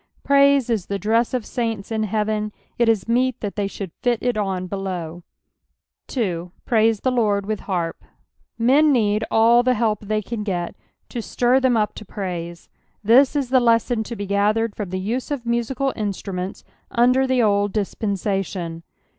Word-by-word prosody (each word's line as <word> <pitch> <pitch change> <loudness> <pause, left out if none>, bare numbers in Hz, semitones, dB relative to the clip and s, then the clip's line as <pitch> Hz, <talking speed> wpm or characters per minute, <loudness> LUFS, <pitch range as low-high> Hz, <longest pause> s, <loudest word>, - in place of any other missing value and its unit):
^Praise 280 -2 +5
is 210 -5 -1
the 200 - -2
dress 225 +4 +1
of 250 -4 -2
saints 225 -4 -3
in 220 -1 0
heaven, 215 0 -1 0.3
it 235 -1 +4
is 220 -3 +1
meet 250 +1 +1
that 205 -2 -4
they 205 -1 -1
should 195 -2 -7
fit 245 -1 +2
it 245 -1 +1
on 190 -3 -2
belowN 180 -3 -5 0.9
2. 180 -8 -2
'• - - -53
Praise 225 -3 +2
the 255 - +1
Lord 210 -5 +1
with 215 0 -2
harp." 175 -4 -3 0.5
Men 275 +6 +4
need 215 -4 +2
alt 235 +2 +5
the 255 0 +3
help 215 -2 0
the^Tan 215 +1 -2
get 175 -4 -2 0.4
to 240 - -4
Stir 245 +3 +2
tbem 260 -3 +2
up 210 - 0
to - - -9
praise. 175 -4 -6 0.4
This 255 +7 +5
is 275 -4 0
the 260 0 +5
lesson 230 -1 +2
to 235 - -6
he 205 - -4
gathered 205 +2 +1
from 205 -4 -4
the 185 - -3
use 230 +7 -3
of 280 -5 -3
musical 240 +3 -1
inatmments 195 -3 -4 0.3
under 250 +3 +3
the 255 -2 +2
old 205 -1 +2
dispensation. 195 -4 -2
215 Hz, 170 wpm, -22 LUFS, 195-240 Hz, 0.9 s, ^Praise